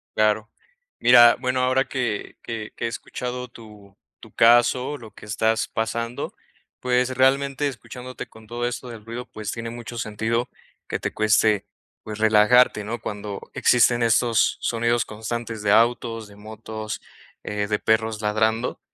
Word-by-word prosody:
Claro, 110 0 +2 0.5
mira, 120 -1 +7
bueno, 130 0 0
ahora 130 +1 +2
que 120 -6 -3
que 110 -2 -6
que - - -4
he - - +1
escuchado 125 +2 -5
tu 105 -4 -15 0.2
tu - - -14
caso, 120 +4 +4
lo 115 -4 -12
que 100 - -14
estás 110 +1 0
pasando, 115 +2 -3 0.4
pues, 125 0 +1
realmente 140 +2 +2
escuchándote 130 -1 -8
con 110 0 -17
todo 120 +2 -2
esto 125 +1 -5
del 115 -3 -9
ruido, 120 +2 -6
pues, 110 -2 -6
tiene 115 0 -5
mucho 120 0 -8
sentido 115 +2 -2 0.4
que - - -2
te - - -3
cueste, 110 -1 +2 0.4
pues, 110 0 -7
relajarte, 110 +1 +5
¿no?, 115 +1 -4
cuando 105 -1 -5
existen 120 0 +4
estos 115 0 +3
sonidos 115 0 +1
constantes 110 +1 -5
de 100 - +2
autos, 115 0 +2
de 100 - -15
motos, 110 0 -7 0.4
eh, 105 0 -2
de 105 0 0
perros 110 -1 +1
ladrando, 110 +3 0
115 Hz, 150 wpm, -23 LUFS, 110-120 Hz, 0.5 s, mira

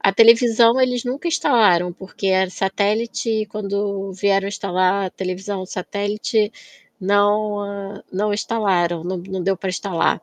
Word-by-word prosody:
A 195 - +3
televisão 230 +2 +5
eles 250 -2 +1
nunca 260 +7 -4
instalaram, 180 - +3
porque 190 +1 -5
era 190 0 +3
satélite 205 +5 -1
e - - -6
quando 200 -1 -3
vieram 195 +1 +1
instalar 190 0 0
a 185 - -6
televisão 190 +1 -4
o 185 - -8
satélite 205 +4 -2 0.5
não 205 0 0
não 205 +2 0
instalaram, 185 -6 0
não 185 +1 -3
não 185 +1 -5
deu 195 +1 +1
para 190 - -5
instalar. 180 -2 -1
200 Hz, 140 wpm, -20 LUFS, 190-215 Hz, 0.5 s, televisão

